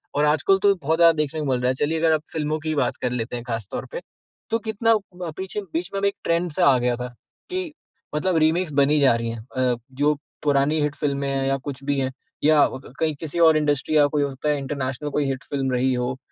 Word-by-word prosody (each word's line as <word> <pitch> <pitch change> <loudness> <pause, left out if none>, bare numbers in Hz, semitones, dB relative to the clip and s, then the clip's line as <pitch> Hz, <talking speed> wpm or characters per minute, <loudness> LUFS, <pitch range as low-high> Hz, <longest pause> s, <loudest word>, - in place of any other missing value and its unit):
और 145 - +3
आजकल 155 +6 +3
तो 200 -1 +5
बहुत 160 -2 -1
ज़्यादा 170 -1 +7
देखने 150 +1 -1
को 150 - -2
मिल 125 - +1
रहा 125 - +1
है। - - +2
चलिए 160 +2 -1
अगर 165 0 +3
आप 155 - +1
फ़िल्मों 155 0 -1
की 155 - -4
ही 155 - 0
बात 140 -4 +1
कर 125 - 0
लेते 120 0 -3
हैं 120 - -5
ख़ास 115 -4 -3
तौर - - -4
पे, - - -5 0.5
तो 225 +1 +1
कितना 225 +1 +1 0.2
ब 175 -3 -5
पीछे 190 +2 -3
बीच 175 +3 -2
में 195 - -1
एक 200 - -1
ट्रेंड 170 +1 0
सा 175 +4 +2
आ 135 -2 +6
गया 125 0 +1
था 125 +1 -5 0.4
कि 365 -3 -2 0.4
मतलब 175 +2 +1
रीमेक्स 160 +2 +2
बनी 145 +2 +4
जा 135 -4 +5
रही 115 0 -2
हैं। 115 -1 -8
अ, 125 -1 +2 0.2
जो 145 +3 +2 0.3
पुरानी 145 +2 +2
हिट 145 -1 -1
फ़िल्में 140 -1 -1
हैं 135 0 -1
या 135 - +2
कुछ 140 0 -7
भी 140 0 0
है, 130 -1 -1 0.3
या 150 -1 +5 0.2
क - - -14
कहीं 160 -1 +1
किसी 160 +1 -3
और 160 -2 +6
इंडस्ट्री 150 0 0
या 145 - +6
कोई 145 0 0
हो 140 - -1
सकता 135 +3 -3
है 150 - +2
इंटरनेशनल 135 +1 -3
कोई 145 0 0
हिट 135 -1 -3
फ़िल्म 135 -2 -1
रही 130 +1 +1
हो, 125 +1 -2
150 Hz, 255 wpm, -23 LUFS, 135-160 Hz, 0.5 s, ज़्यादा